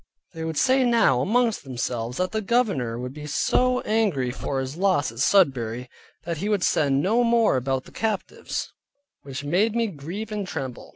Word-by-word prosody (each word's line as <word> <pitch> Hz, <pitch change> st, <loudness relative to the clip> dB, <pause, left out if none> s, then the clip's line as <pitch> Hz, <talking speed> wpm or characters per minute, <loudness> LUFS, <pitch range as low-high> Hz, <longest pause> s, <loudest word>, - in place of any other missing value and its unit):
They 165 Hz, -1 st, -6 dB
would 160 Hz, -1 st, -3 dB
say 260 Hz, 0 st, +4 dB
now 235 Hz, -, +3 dB
amongst 230 Hz, -, +1 dB
themselves, 125 Hz, -2 st, -3 dB
that 185 Hz, 0 st, -1 dB
the 220 Hz, -, -1 dB
governor 195 Hz, -, 0 dB
would 125 Hz, +1 st, -5 dB
be 150 Hz, 0 st, -8 dB
so 250 Hz, -, +2 dB
angry 195 Hz, -, 0 dB
for 135 Hz, +1 st, -3 dB
his 130 Hz, +2 st, -4 dB
loss 180 Hz, -, +1 dB
at 115 Hz, -, -11 dB
Sudbury, 125 Hz, -, +2 dB, 0.3 s
that 170 Hz, 0 st, -3 dB
he 200 Hz, +7 st, -2 dB
would 205 Hz, -4 st, +1 dB
send 140 Hz, -2 st, +2 dB
no 225 Hz, +6 st, +3 dB
more 230 Hz, -, +3 dB
about 130 Hz, 0 st, -1 dB
the -, -, -15 dB
captives, 220 Hz, -2 st, -3 dB, 0.5 s
which 135 Hz, 0 st, -7 dB
made 195 Hz, +9 st, +1 dB
me 235 Hz, -1 st, +2 dB
grieve 195 Hz, +4 st, -6 dB
and 205 Hz, -2 st, -3 dB
tremble. 130 Hz, -7 st, -6 dB
165 Hz, 180 wpm, -24 LUFS, 130-220 Hz, 0.5 s, say